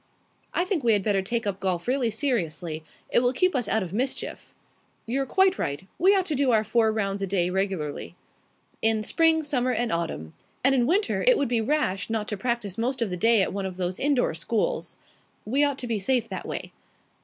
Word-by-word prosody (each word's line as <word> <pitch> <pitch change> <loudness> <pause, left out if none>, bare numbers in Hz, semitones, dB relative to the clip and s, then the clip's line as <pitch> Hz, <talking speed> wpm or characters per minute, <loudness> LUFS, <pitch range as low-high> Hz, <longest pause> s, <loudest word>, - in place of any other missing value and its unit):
"I 350 - 0
think 365 -7 -1
we 230 -2 +4
had 205 -2 +1
better 200 -2 +2
take 230 +4 -2
up 200 -1 -2
golf 185 -1 -2
really 255 -2 +1
seriously. 175 - -2 0.3
It - - +5
will 245 +1 +2
keep 365 +7 +2
us 245 -5 0
out 220 -1 +1
of 180 0 -7
mischief." 255 +5 -3 0.5
"You're 270 +4 -1
quite 380 +5 +3
right. 140 +6 -3
We 385 +3 +5
ought 380 -2 +2
to 315 - -2
do 275 -1 +2
our 220 -3 +4
four 220 +1 +2
rounds 200 -2 -2
a 195 - -1
day 180 -2 +1
regularly." 190 -6 -2 0.7
"In 220 -1 +3
spring, 320 +5 +3
summer, 255 -4 0
and 240 -1 0
autumn. 160 - -3 0.3
And 270 +1 +5
in 245 -3 +2
winter 400 +7 +1
it - - +6
would 280 - 0
be 235 -2 +1
rash 220 -8 0
not 220 -1 -2
to 210 - -2
practise 230 -3 -2
most 255 +3 -1
of 210 - -3
the - - -1
day 225 +2 +4
at - - -2
one 195 -1 -2
of 185 -1 -8
those 180 0 -2
indoor 275 - +2
schools." 170 +7 -2 0.5
"We 270 +7 +2
ought 285 -2 +1
to 250 - -5
be 230 -3 -1
safe 235 +3 +1
that - - -5
way." - - -5
225 Hz, 215 wpm, -26 LUFS, 195-265 Hz, 0.7 s, it